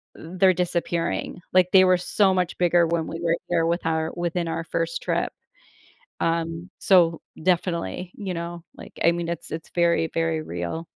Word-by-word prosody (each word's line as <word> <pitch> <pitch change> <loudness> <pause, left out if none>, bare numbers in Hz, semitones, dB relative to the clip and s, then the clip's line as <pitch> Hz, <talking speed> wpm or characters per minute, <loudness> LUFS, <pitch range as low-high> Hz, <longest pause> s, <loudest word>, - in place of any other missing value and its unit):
they're 185 +3 +2
disappearing. 170 -1 -2
Like, 180 -1 +5
they 190 -1 +8
were 185 0 +5
so 190 +2 +2
much 180 -2 -1
bigger 175 -1 +4
when 165 -1 0
we 165 - -5
were 170 -1 +2
here 165 -2 +2
with 170 +1 0
our 160 0 0
within 175 0 -2
our 165 0 -2
1st - - -2
trip." - - -1 0.9
Um, 165 +1 -1
so, 170 -4 +4 0.2
definitely, 180 - -1
you 195 -3 -4
know, 170 0 -5
like, - - -11
I 170 - +6
mean, 170 0 -3
it's 170 -2 -4
it's 160 0 -6
very, 170 -2 +2
very 165 -1 0
real. 85 - -5
170 Hz, 170 wpm, -24 LUFS, 165-180 Hz, 0.9 s, they